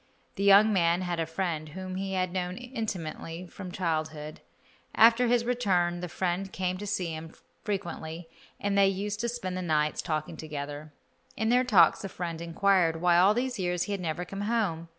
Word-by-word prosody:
The - - -6
young 200 +2 +7
man 170 -1 +3
had 175 -2 -2
a 165 - -1
friend 165 -2 -3
whom 185 +4 -6
he 190 +1 -3
had 185 -1 -1
known 180 -1 -2
intimately 185 -9 -5
from 180 +1 -9
childhood. 155 -4 -3 0.5
After 230 +2 +6
his 235 0 +2
return 185 -8 +1
the 180 0 -5
friend 185 +2 -2
came 185 -1 -2
to 205 - -5
see 180 -5 -2
him 160 +1 -8 0.3
frequently, 170 -5 -4 0.3
and 200 0 -1
they 200 -1 +5
used 200 +2 -2
to 235 - -1
spend 190 -6 -4
the 185 - -3
nights 155 -3 +1
talking 155 -2 -3
together. 150 0 -6 0.5
In 220 0 0
their 250 +1 +4
talks 195 -10 +5
the 195 - -5
friend 170 -3 -5
inquired 170 -1 +2
why 175 0 +4
in - - +6
all 200 +3 +5
these 250 -1 -1
years 180 -1 0
he 205 - -5
had 200 -2 -2
never 175 +1 -3
come 195 +3 -6
home. 205 -7 -1
180 Hz, 190 wpm, -28 LUFS, 165-200 Hz, 0.5 s, young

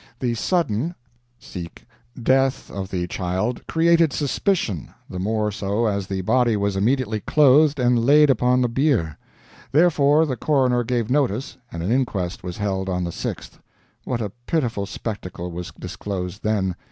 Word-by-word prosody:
The 120 -2 0
sudden 160 - 0 1.3
death 135 +2 +2
of 95 -1 -5
the 90 -2 -2
child 95 +6 -2
created 165 -1 +3
suspicion, 135 - -1 0.2
the 90 - -6
more 105 +2 0
so 100 +3 -1
as 100 -3 -1
the 95 -1 -2
body 115 +2 +2
was 100 -1 0
immediately 110 +1 +1
clothed 145 +4 +4
and 120 -2 +3
laid 145 +3 +6
upon 125 +1 +2
the 125 - +3
bier. 120 - 0 0.5
Therefore 155 -1 +4
the 130 -5 -3
coroner 130 -3 +2
gave 120 -1 -1
notice, 135 -2 0
and 85 0 -5
an 95 - -1
inquest 100 -8 -1
was 90 -1 -6
held 95 -2 -2
on 90 -1 -1
the 85 - -3
6th. - - -6 0.4
What 120 -2 -2
a 105 -3 -3 0.2
pitiful 120 -11 -1
spectacle 90 -6 -6
was 90 +2 -6
disclosed 90 0 -5
then! 100 -4 0
115 Hz, 150 wpm, -22 LUFS, 95-135 Hz, 1.3 s, laid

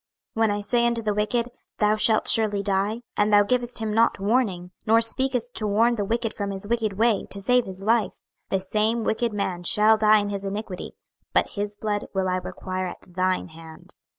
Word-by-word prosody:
26:003:018 - - -4
When 225 - +4
I - - -4
say 235 +3 +1
unto 235 -1 -1
the 210 -1 0
wicked, 230 +3 -1 0.3
Thou 210 0 +2
shalt 215 0 +3
surely 210 -3 +3
die; 200 +3 -1
and 205 +1 +1
thou 205 0 +6
givest 245 +2 0
him 220 -2 -2
not 225 -1 +2
warning, 195 -4 0 0.2
nor 225 +1 +5
speakest 245 +1 +1
to 215 - -3
warn 225 +4 +3
the 215 -3 -2
wicked 225 +2 -2
from 200 -1 -4
his 195 +1 -5
wicked 225 -2 -1
way, 220 0 +1
to 200 - -4
save 250 +4 +2
his 190 0 -8
life; 225 0 +1 0.3
the 195 - 0
same 215 +4 0
wicked 230 +2 0
man 190 -4 -3
shall 210 +5 +4
die 215 0 +5
in 205 -1 -1
his 200 -1 -3
iniquity; 200 -1 -5 0.4
but - - +2
his 205 0 -4
blood 205 -1 -3
will 190 -1 0
I 185 0 0
require 185 0 -5
at 180 0 -11
thine 185 0 -1
hand. 160 0 -13
210 Hz, 205 wpm, -24 LUFS, 195-230 Hz, 0.4 s, thou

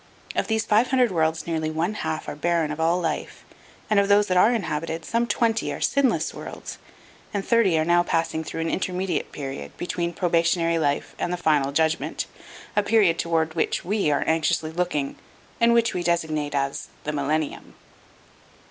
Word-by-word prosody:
Of - - 0
these 220 -1 0
five 220 +4 +3
hundred 250 -4 +3
worlds 160 -2 0
nearly 160 -2 -1
one 165 +6 -1
half 160 -6 -3
are - - -4
barren 165 0 0
of 150 - -5
all 165 +2 +2
life, 165 -3 -4 0.4
and 215 -2 +3
of 200 - +2
those 205 +1 +5
that 185 - +2
are 205 +6 +6
inhabited 165 -6 -2
some 235 +1 0
twenty 225 +1 +1
are - - -5
sinless 280 -3 +1
worlds - - -8 0.6
and 200 -1 -1
thirty 225 -8 +3
are 155 - +1
now 175 +1 +4
passing 165 -2 -1
through 165 - -5
an 165 - -1
intermediate 185 -3 -2
period 135 -1 -7
between 175 -1 -2
the - - -20
probationary 170 -1 +2
life 145 -2 -1
and 175 - -1
the 180 - -1
final 150 -5 +2
judgment, 160 +2 0 0.5
a 210 - +4
period 200 -5 +3
toward 160 -1 0
which 165 - -1
we 200 -3 +1
are 145 - +1
anxiously 160 0 +1
looking 160 -5 -2 0.4
and 235 0 +5
which 235 0 +3
we 180 - -2
designate 155 -4 -1
as 140 0 -2 0.2
the 150 - -2
Millennium. 150 +1 -2
170 Hz, 180 wpm, -24 LUFS, 155-195 Hz, 0.6 s, are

